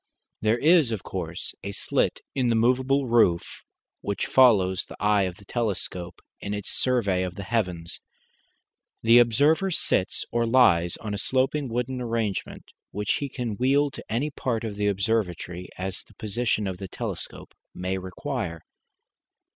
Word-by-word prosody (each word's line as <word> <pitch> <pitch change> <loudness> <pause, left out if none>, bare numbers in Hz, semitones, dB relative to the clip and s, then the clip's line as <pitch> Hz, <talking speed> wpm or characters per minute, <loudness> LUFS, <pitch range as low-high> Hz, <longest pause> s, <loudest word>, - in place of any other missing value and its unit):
There 110 +2 +2
is, 155 -2 +4
of 110 -5 -3
course, 85 -4 -4
a 100 - -4
slit - - 0
in 130 -3 +1
the 115 - +3
movable 130 +4 +2
roof 115 -8 +2 0.4
which 100 - -2
follows 100 -8 +4
the - - -11
eye 105 -1 +3
of 90 -1 -4
the 100 - -18
telescope 95 -6 -3 0.2
in 100 +1 -4
its 105 - -4
survey 110 -8 +1
of 90 -1 -3
the 100 - -6
heavens. 90 -6 -2 1.0
The 115 +2 +7
observer 145 - +3
sits 155 - 0
or 115 0 +1
lies 95 -9 +4
on 105 -2 -5
a 100 - -3
sloping 130 +3 0
wooden 125 +2 -2
arrangement, 115 -4 -3 0.2
which 105 0 -1
he 140 - -3
can 120 -5 -4
wheel 140 +3 +3
to - - -9
any 135 +7 0
part 120 -5 -2
of 110 -3 -4
the 105 0 0
observatory 95 -3 -1
as 95 0 -4
the - - -23
position 110 0 -1
of 95 -2 -4
the 95 - -5
telescope - - -7 0.2
may 95 +1 -2
require. 95 - -4
110 Hz, 155 wpm, -26 LUFS, 95-125 Hz, 1.0 s, The